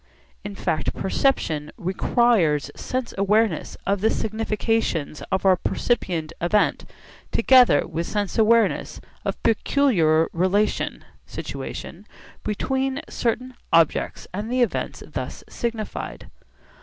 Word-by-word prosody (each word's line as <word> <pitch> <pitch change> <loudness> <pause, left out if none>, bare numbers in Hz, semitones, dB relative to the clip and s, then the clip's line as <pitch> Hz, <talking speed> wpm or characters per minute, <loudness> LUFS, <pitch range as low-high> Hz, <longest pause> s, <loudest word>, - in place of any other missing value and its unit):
In 205 -1 -6
fact 155 -5 -1
perception 165 - 0
requires 185 -4 +2
sense 255 -2 -3
awareness 205 -2 +1
of 200 -1 0
the 220 - +3
significations 220 -8 -1
of 190 0 0
our 190 -1 +6
percipient 175 -5 -1
event 205 +5 +2 0.5
together 245 - +5
with 170 +2 -3
sense 205 -2 -2
awareness 230 +1 +2 0.2
of - - -1
a - - +1
peculiar 170 - +2
relation 190 +5 0 0.2
(situation) - - -7 0.4
between 265 +6 -1
certain 250 +2 -2 0.2
objects 165 -2 +2
and 210 +5 -4
the 255 0 +3
events 235 - -3
thus - - -6
signified. 230 -3 -5
210 Hz, 105 wpm, -23 LUFS, 175-235 Hz, 0.5 s, our